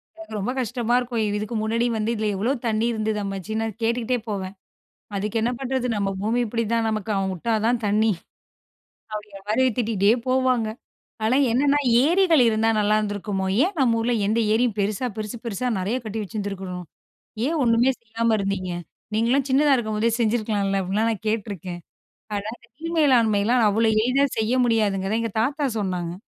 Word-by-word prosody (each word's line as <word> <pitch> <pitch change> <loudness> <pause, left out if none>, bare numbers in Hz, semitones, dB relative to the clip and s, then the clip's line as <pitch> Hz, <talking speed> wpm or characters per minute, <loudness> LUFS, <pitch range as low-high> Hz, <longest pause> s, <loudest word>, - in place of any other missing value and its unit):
எனக்கு 330 -7 -11
ரொம்ப 205 +5 -1
கஷ்டமா 240 -1 -1
இருக்கும். 240 -2 -2 0.2
இதுக்கு 215 +2 -4
முன்னாடி 230 +2 +1
வந்து, 215 +2 0
"இதில 215 -1 -1
எவ்வளோ 220 +7 0 0.2
தண்ணீ 220 +1 +1
இருந்தது 215 -1 -1
அம்மமச்சி?" 195 +1 -4
நான் 225 -2 -2
கேட்டுக்கிட்டே 235 +2 0
போவேன். 190 -2 -3 0.6
"அதுக்கு 210 +3 -1
என்ன 235 - +1
பண்றது? 260 -1 -1
நம்ம 200 -1 0
பூமி 225 +4 +1
இப்படிதான். 230 0 0
நமக்கு 215 0 -2
அவன் 195 -1 0
விட்டா 225 +6 -2
தான் 235 0 +2
தண்ணீ.” 215 +2 +3 1.0
அப்படிங்குற 210 -2 -7
மாரி 235 +5 +3
திட்டிகிட்டே 215 -3 +2 0.2
போவாங்க. 255 -3 +2 0.6
ஆனா 245 +4 +3 0.2
என்னன்னா, 280 +4 +3 0.3
"ஏரிகள் 335 -4 +4
இருந்தா 220 0 +2
நல்லாருந்திருக்குமோ? 205 -2 0 0.2
ஏன் 375 +2 -2
நம்ம 235 -3 +3
ஊர்ல 240 +2 0
எந்த 220 +3 +1
ஏரியும் 225 -1 +2
பெருசா, 210 +5 -1
பெருசு 215 +2 -5
பெருசா 235 +2 -3
நெறைய 200 +6 -1
கட்டி 220 +1 -4
வச்சுருந்துருக்கணும்? 195 -4 -5 0.6
ஏன் 325 +2 0
ஒண்ணுமே 235 +2 +4
செய்யாம 230 0 0
இருந்தீங்க? 195 -2 -2 0.5
நீங்கள்லாம் 255 +5 +2
சின்னதா 280 +1 +4
இருக்கும்போதே 220 -1 0
செஞ்சிருக்கலாம்ல!” 210 -4 +1
அப்டின்லாம் 210 +5 0
நான் 215 0 -7
கேட்டுருக்கேன். 195 -5 -3 0.5
ஆனா, 205 +1 -3
அந்த 240 - -23
நீர் 330 +1 -4
மேலாண்மைலாம் 235 -5 +4
அவ்வளோ 220 +2 +2
எளிதா 255 +5 +3
செய்ய 220 +3 +1
முடியாதுங்கறத, 210 -2 +1
எங்க 230 -1 -2
தாத்தா 285 +4 0
சொன்னாங்க. 180 -3 -2
220 Hz, 155 wpm, -23 LUFS, 205-240 Hz, 1.0 s, ஏரிகள்